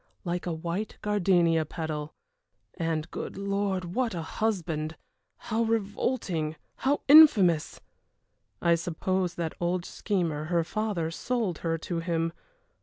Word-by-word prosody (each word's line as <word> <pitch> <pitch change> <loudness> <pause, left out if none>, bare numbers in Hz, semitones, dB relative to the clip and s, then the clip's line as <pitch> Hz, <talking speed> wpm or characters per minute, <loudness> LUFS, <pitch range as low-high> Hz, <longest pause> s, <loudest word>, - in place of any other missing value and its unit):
like 175 -1 -3
a - - 0
white 170 +6 -3
gardenia 175 -5 +3
petal 155 -1 -5 0.6
and, 165 -2 -2
good - - -5
Lord, 200 -1 -1
what 245 -4 0
a 165 - -3
husband! 160 -6 -2 0.4
How 225 0 -2
revolting, 205 -7 -1 0.2
how 280 +2 +1
infamous! 215 - +7 0.8
I 170 - +5
suppose 180 +2 -1
that 165 -2 -3
old 175 0 -1
schemer, 170 -7 -1
her 170 0 +1
father, 190 -3 -2
sold 220 -2 -2
her 165 -1 -1
to 170 +1 -3
him. 165 -1 -1
175 Hz, 120 wpm, -28 LUFS, 165-205 Hz, 0.8 s, infamous